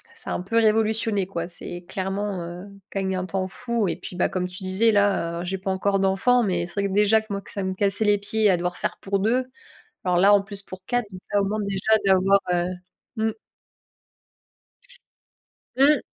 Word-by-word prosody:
ça -, -, -7 dB
a -, -, 0 dB
un -, -, -2 dB
peu 225 Hz, +5 st, -2 dB
révolutionné, 220 Hz, -2 st, +2 dB
quoi. 170 Hz, -3 st, -4 dB
C'est 175 Hz, 0 st, -7 dB
clairement, 195 Hz, 0 st, -3 dB
heu, 175 Hz, +2 st, -8 dB, 0.2 s
q 195 Hz, -, -3 dB
un -, -, -1 dB
gain 185 Hz, -1 st, -1 dB
de -, -, -6 dB
temps 190 Hz, -1 st, -2 dB
fou 235 Hz, +1 st, -2 dB
et 165 Hz, -, -1 dB
puis, 180 Hz, 0 st, -9 dB
bah, -, -, +2 dB
comme 180 Hz, -1 st, -2 dB
tu 180 Hz, +1 st, -9 dB
disais, 190 Hz, +5 st, +4 dB
là, 200 Hz, -5 st, +1 dB
heu, 180 Hz, -, -5 dB
j'ai 190 Hz, +2 st, -2 dB
pas 190 Hz, +1 st, -3 dB
encore 195 Hz, +1 st, +1 dB
d'enfants, 230 Hz, +6 st, +3 dB
mais 175 Hz, -3 st, -1 dB
c'est 185 Hz, +3 st, -3 dB
vrai 200 Hz, -, 0 dB
que 190 Hz, -, -4 dB
déjà 210 Hz, +2 st, +4 dB
que 220 Hz, -, -18 dB
moi, 200 Hz, 0 st, -3 dB
ça 200 Hz, -, -4 dB
me 190 Hz, 0 st, -1 dB
cassait 200 Hz, +2 st, +1 dB
les 205 Hz, 0 st, +4 dB
pieds 210 Hz, +1 st, +2 dB
à 180 Hz, -, +3 dB
devoir 175 Hz, +1 st, -2 dB
faire -, -, -3 dB
pour 200 Hz, 0 st, -1 dB
2, 245 Hz, +6 st, +1 dB, 0.6 s
alors 180 Hz, -1 st, +2 dB
là, 200 Hz, +3 st, +6 dB
en 200 Hz, -, +5 dB
plus, 200 Hz, 0 st, -6 dB
pour 190 Hz, -1 st, -10 dB
4, 245 Hz, -1 st, 0 dB
ça 185 Hz, -, -8 dB
permet 200 Hz, -1 st, +2 dB
au -, -, -2 dB
moins 215 Hz, +1 st, -1 dB
déjà 195 Hz, +2 st, -1 dB
d'avoir, 195 Hz, +1 st, +4 dB
heu, 175 Hz, 0 st, +1 dB, 0.5 s
mmh 220 Hz, 0 st, +1 dB, 2.5 s
Mmh. 285 Hz, +3 st, +5 dB
195 Hz, 220 wpm, -24 LUFS, 185-210 Hz, 2.5 s, là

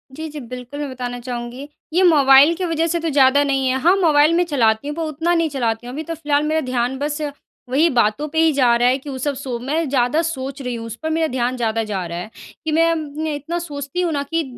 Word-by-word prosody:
जी, 320 Hz, +1 st, -5 dB
जी 300 Hz, 0 st, -7 dB
बिल्कुल 250 Hz, +2 st, -8 dB
मैं 290 Hz, -1 st, -3 dB
बताना 245 Hz, -1 st, -5 dB
चाहूँगी 245 Hz, +2 st, -6 dB, 0.3 s
ये 370 Hz, +2 st, +3 dB
मोबाइल 285 Hz, -2 st, +6 dB
की 365 Hz, +1 st, -3 dB
वजह 330 Hz, 0 st, 0 dB
से 340 Hz, +1 st, 0 dB
तो 330 Hz, 0 st, -2 dB
ज़्यादा 280 Hz, 0 st, +4 dB
नहीं 270 Hz, -2 st, 0 dB
है। 260 Hz, +1 st, +1 dB
हाँ 355 Hz, +5 st, +5 dB
मोबाइल 310 Hz, -3 st, +4 dB
में 350 Hz, +1 st, +3 dB
चलाती 235 Hz, -5 st, +1 dB
हूँ 295 Hz, -, -4 dB
पर 335 Hz, -, -4 dB
उतना 320 Hz, +3 st, -1 dB
नहीं 330 Hz, -2 st, +1 dB
चलाती 240 Hz, -3 st, -2 dB
हूँ। 250 Hz, -, -7 dB
अभी 310 Hz, +3 st, -4 dB
तो 330 Hz, -, -5 dB
फ़िलहाल 295 Hz, -1 st, 0 dB
मेरा 315 Hz, +1 st, 0 dB
ध्यान 255 Hz, 0 st, -1 dB
बस 295 Hz, +1 st, -2 dB, 0.5 s
वही 295 Hz, +7 st, +3 dB
बातों 245 Hz, +3 st, +1 dB
पे 320 Hz, -, +1 dB
ही 325 Hz, 0 st, +5 dB
जा 250 Hz, -4 st, +4 dB
रहा 240 Hz, +1 st, +3 dB
है 255 Hz, -, +2 dB
कि 280 Hz, +1 st, -10 dB
वो 265 Hz, -, -5 dB
सब 285 Hz, +3 st, -1 dB
सो 260 Hz, -3 st, -4 dB
मैं 300 Hz, +5 st, -1 dB
ज़्यादा 260 Hz, +4 st, +2 dB
सोच 275 Hz, -4 st, -4 dB
रही 250 Hz, -2 st, -3 dB
हूँ 230 Hz, -1 st, -6 dB
उस 230 Hz, -, -6 dB
पर 315 Hz, -, -1 dB
मेरा 320 Hz, 0 st, +1 dB
ध्यान 250 Hz, -1 st, -1 dB
ज़्यादा 225 Hz, -1 st, 0 dB
जा 200 Hz, -4 st, -3 dB
रहा 170 Hz, 0 st, -5 dB
है 180 Hz, +5 st, -6 dB, 0.4 s
कि 315 Hz, -, -1 dB
मैं 330 Hz, +2 st, +4 dB
अम 330 Hz, -, 0 dB, 0.2 s
न 315 Hz, -, -1 dB
इतना 300 Hz, +3 st, -3 dB
सोचती 290 Hz, 0 st, -4 dB
हूँ 350 Hz, -2 st, 0 dB
ना 285 Hz, -, -1 dB
कि 330 Hz, 0 st, +1 dB
285 Hz, 265 wpm, -20 LUFS, 250-315 Hz, 0.5 s, मोबाइल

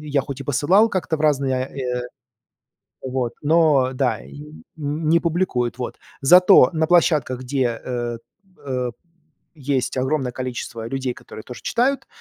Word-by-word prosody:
я 145 Hz, -2 st, 0 dB
хоть 140 Hz, +1 st, -7 dB
и -, -, -6 dB
посылал 175 Hz, -, +3 dB
как-то 180 Hz, -5 st, -1 dB
в -, -, -11 dB
разные, 140 Hz, -3 st, +2 dB
э, 125 Hz, -2 st, -4 dB, 1.0 s
вот, 130 Hz, -2 st, -2 dB
но 150 Hz, -4 st, +3 dB
да, 125 Hz, -4 st, 0 dB
н 150 Hz, +1 st, -12 dB
не 155 Hz, +2 st, +1 dB
публикуют, 165 Hz, -9 st, -1 dB
вот. 125 Hz, -, -5 dB, 0.2 s
Зато 180 Hz, -1 st, +7 dB
на 160 Hz, -1 st, +1 dB
площадках, 155 Hz, -7 st, +2 dB
где, 125 Hz, -3 st, -1 dB
э, 120 Hz, -2 st, -3 dB, 0.5 s
э, 125 Hz, -2 st, -2 dB, 0.7 s
есть 135 Hz, -2 st, -1 dB
огромное 130 Hz, 0 st, 0 dB
количество 120 Hz, -3 st, -5 dB
людей, 130 Hz, 0 st, -2 dB
которые 110 Hz, -, -11 dB
тоже 125 Hz, -, -10 dB
читают, 255 Hz, +4 st, 0 dB
135 Hz, 140 wpm, -21 LUFS, 125-155 Hz, 1.0 s, Зато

